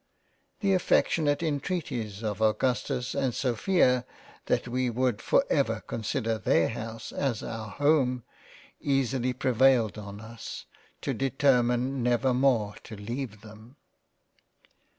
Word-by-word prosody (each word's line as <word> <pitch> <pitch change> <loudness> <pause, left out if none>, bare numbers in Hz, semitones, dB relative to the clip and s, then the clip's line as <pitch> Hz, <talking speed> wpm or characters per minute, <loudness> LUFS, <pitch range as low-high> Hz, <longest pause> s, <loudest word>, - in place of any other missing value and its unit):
The 200 -2 +3
affectionate 155 -4 +2
Entreaties 135 - -3
of 105 -1 -3
Augustus 120 +2 0
and 135 -3 0
Sophia 125 - +2 0.4
that - - +1
we 125 +1 0
would 120 -2 0
for - - +3
ever - - +1
consider 115 0 -2
their 85 -4 +3
House 115 -1 -6
as 130 -6 -1
our 110 -2 -5
Home, 140 -4 +2 0.6
easily 135 -2 0
prevailed 125 -3 +3
on 100 -1 -8
us 115 +1 -8 0.4
to - - -1
determine 130 -1 +2
never 125 +2 +2
more 125 -5 +2
to 110 - -8
leave 110 +1 -5
them. 110 +4 -14
125 Hz, 115 wpm, -28 LUFS, 110-135 Hz, 0.6 s, The